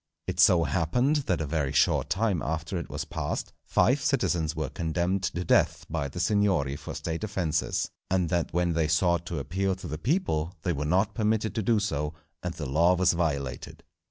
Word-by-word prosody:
It -, -, -4 dB
so 85 Hz, -2 st, +6 dB
happened 90 Hz, -, +1 dB
that 90 Hz, -3 st, +1 dB
a -, -, -1 dB
very 75 Hz, -2 st, -1 dB
short 70 Hz, -, +2 dB
time 100 Hz, -5 st, +1 dB
after 80 Hz, +5 st, -3 dB
it 85 Hz, -, -7 dB
was -, -, -4 dB
passed, -, -, -4 dB
five 130 Hz, +4 st, +2 dB
citizens 85 Hz, -, 0 dB
were 80 Hz, -3 st, -2 dB
condemned 85 Hz, +5 st, -1 dB
to 90 Hz, -1 st, -2 dB
death -, -, +2 dB
by 80 Hz, -3 st, -1 dB
the 70 Hz, +6 st, -7 dB
"Signory" 95 Hz, -8 st, +2 dB
for -, -, -7 dB
State 80 Hz, +3 st, -4 dB
offences, 90 Hz, -7 st, -1 dB, 0.2 s
and 90 Hz, -2 st, +2 dB
that 85 Hz, -2 st, 0 dB
when 85 Hz, 0 st, +1 dB
they 80 Hz, -1 st, +1 dB
sought 85 Hz, +2 st, +2 dB
to 85 Hz, -, -3 dB
appeal 95 Hz, +6 st, -1 dB
to 95 Hz, -, -11 dB
the 75 Hz, -1 st, -5 dB
people 90 Hz, -, 0 dB
they 90 Hz, -, 0 dB
were 75 Hz, 0 st, -3 dB
not 95 Hz, +7 st, +2 dB
permitted 110 Hz, 0 st, 0 dB
to 110 Hz, -, -1 dB
do 110 Hz, +1 st, +2 dB
so, 75 Hz, -6 st, -2 dB, 0.3 s
and 90 Hz, -1 st, -4 dB
the 75 Hz, -, -5 dB
law 85 Hz, +7 st, +3 dB
was 90 Hz, 0 st, +3 dB
violated. 70 Hz, -7 st, -3 dB
85 Hz, 195 wpm, -27 LUFS, 80-95 Hz, 0.3 s, so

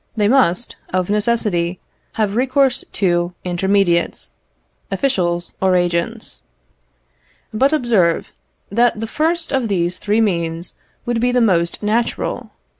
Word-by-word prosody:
They 205 Hz, -1 st, +3 dB
must, 240 Hz, -4 st, +2 dB
of 185 Hz, +1 st, 0 dB
necessity, 205 Hz, -5 st, 0 dB, 0.3 s
have 210 Hz, -2 st, -1 dB
recourse 260 Hz, +1 st, +2 dB
to 175 Hz, -2 st, 0 dB
intermediates, 180 Hz, -1 st, +1 dB, 0.6 s
officials 175 Hz, -10 st, -1 dB
or 190 Hz, -1 st, +3 dB
agents. 175 Hz, +6 st, -1 dB, 1.1 s
But 265 Hz, +6 st, +3 dB
observe, 225 Hz, -, +1 dB, 0.4 s
that 235 Hz, +1 st, +2 dB
the 225 Hz, -, -2 dB
first 325 Hz, +7 st, 0 dB
of 265 Hz, -4 st, 0 dB
these 180 Hz, -2 st, -1 dB
three 210 Hz, +2 st, +1 dB
means 170 Hz, -5 st, -1 dB, 0.3 s
would 240 Hz, -1 st, -1 dB
be 245 Hz, +1 st, +2 dB
the 250 Hz, -, +2 dB
most 175 Hz, -5 st, +1 dB
natural. 225 Hz, +3 st, -1 dB
205 Hz, 115 wpm, -19 LUFS, 175-240 Hz, 1.1 s, They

